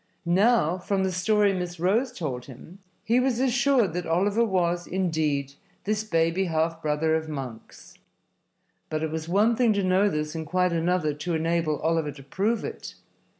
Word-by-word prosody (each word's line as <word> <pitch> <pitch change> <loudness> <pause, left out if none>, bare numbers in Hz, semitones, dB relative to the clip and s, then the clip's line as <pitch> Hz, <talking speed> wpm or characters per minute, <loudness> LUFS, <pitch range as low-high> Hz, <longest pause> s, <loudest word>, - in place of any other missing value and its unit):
Now, 185 -1 +3
from 190 +1 -1
the 190 - 0
story 200 +3 +2
Miss 180 -2 -4
Rose 220 +9 +1
told 140 - -5
him, 140 +8 -13 0.2
he 235 +3 +2
was 255 -2 +1
assured 250 - +2
that 175 -1 -3
Oliver 200 +7 +2
was, 175 -4 0
indeed, 155 -7 -1 0.3
this 215 +1 -1
baby 165 -1 +1
half 165 -1 -1
brother 155 +1 0
of 160 0 -1
Monks. 130 -6 -8 1.0
But 155 0 -2
it 160 - -2
was 160 0 -4
one 210 +6 +3
thing 235 -2 +3
to 200 -1 0
know 185 +2 +3
this 150 -3 -3
and 160 -2 -5
quite 180 +2 +1
another 165 -2 +1
to 150 +4 -3
enable 165 -2 0
Oliver 160 -1 0
to 135 - -13
prove 205 - -1
it. - - -7
175 Hz, 170 wpm, -26 LUFS, 160-200 Hz, 1.0 s, Now